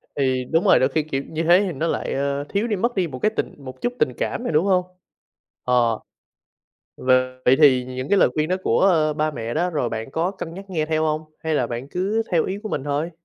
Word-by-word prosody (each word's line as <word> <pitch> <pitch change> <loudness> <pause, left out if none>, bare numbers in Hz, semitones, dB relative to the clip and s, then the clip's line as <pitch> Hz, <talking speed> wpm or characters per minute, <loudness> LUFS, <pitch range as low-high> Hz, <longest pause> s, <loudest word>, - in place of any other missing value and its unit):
Thì 130 -2 0
đúng 165 +7 +1
rồi, 195 - +6
đôi 130 - +3
khi, 155 +2 0
kiểu, 135 -2 -3
như 160 +1 -2
thế 175 +3 +5
thì - - -2
nó 160 +5 -2
lại, - - -2
ơ, 140 +1 -1
thiếu 205 +4 0
đi 215 - 0
mất 235 +5 -1
đi 185 -3 +1
một 130 -4 -8
cái 215 - +2
tình - - -2
một 130 -3 -11
chút 245 +1 -1
tình - - +2
cảm - - -2
rồi, - - -2
đúng 155 +5 +3
hông? 185 -2 +2 0.8
Ờ. 120 -3 +2 1.0
V 130 - -7 0.4
vậy 130 - +5
thì 130 -4 +6
những 130 +1 -6
cái 200 - +4
lời - - +5
khuyên 155 0 0
đó 185 - +1
của, - - +2
ơ, 160 -5 +3
ba 155 0 0
mẹ 115 -4 -5
đó 180 +1 0
rồi 145 -7 -1
bạn 110 +4 -5
có 170 +5 0
cân 170 -4 -7
nhắc 195 +2 -8
nghe 155 -4 -1
theo 155 0 0
hông? 155 0 -1
Hay 160 -1 -2
là 125 -5 +1
bạn 120 +4 -6
cứ 200 +7 -1
theo 170 -3 +2
ý 195 +2 -3
của 215 - -5
mình 135 - -3
thôi? 145 +4 -1
155 Hz, 260 wpm, -22 LUFS, 135-180 Hz, 1.0 s, rồi